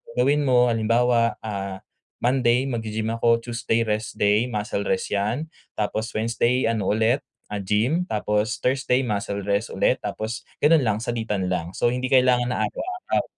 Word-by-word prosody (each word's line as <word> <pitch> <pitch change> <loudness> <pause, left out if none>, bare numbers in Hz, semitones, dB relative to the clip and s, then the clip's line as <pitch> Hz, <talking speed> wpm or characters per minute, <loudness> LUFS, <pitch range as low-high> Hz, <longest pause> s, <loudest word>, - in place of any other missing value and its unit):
gawin 140 +3 +2
mo 125 -1 +4
halimbawa, 115 +1 +2
ah, 100 -3 -5 0.4
Monday 125 0 +3
mag-gi-gym 110 -1 -2
ako, 115 0 +3
Tuesday 115 -1 0
rest 110 0 -2
day 105 +2 +3
muscle 105 -3 -3
rest 95 - -1
'yan, 110 +10 -1 0.3
tapos 110 +1 -2
Wednesday 115 +2 +1
ano 110 -4 -2
ulit, 110 +5 +2 0.3
ah, 105 - -2
gym, 110 - +1
tapos 105 - -1
Thursday 130 0 +2
muscle 100 -3 -2
rest 100 +3 0
ulit, 130 - +2
tapos 110 +2 -5 0.2
gano'n 155 +2 +6
lang 105 -2 +1
salitan 110 -6 -2
lang. 85 -1 -2
So, 120 - +2
hindi 125 +1 -2
kailangan 125 -2 +4
na 110 - -1
araw-araw. 370 - -2
115 Hz, 150 wpm, -24 LUFS, 105-125 Hz, 0.4 s, gano'n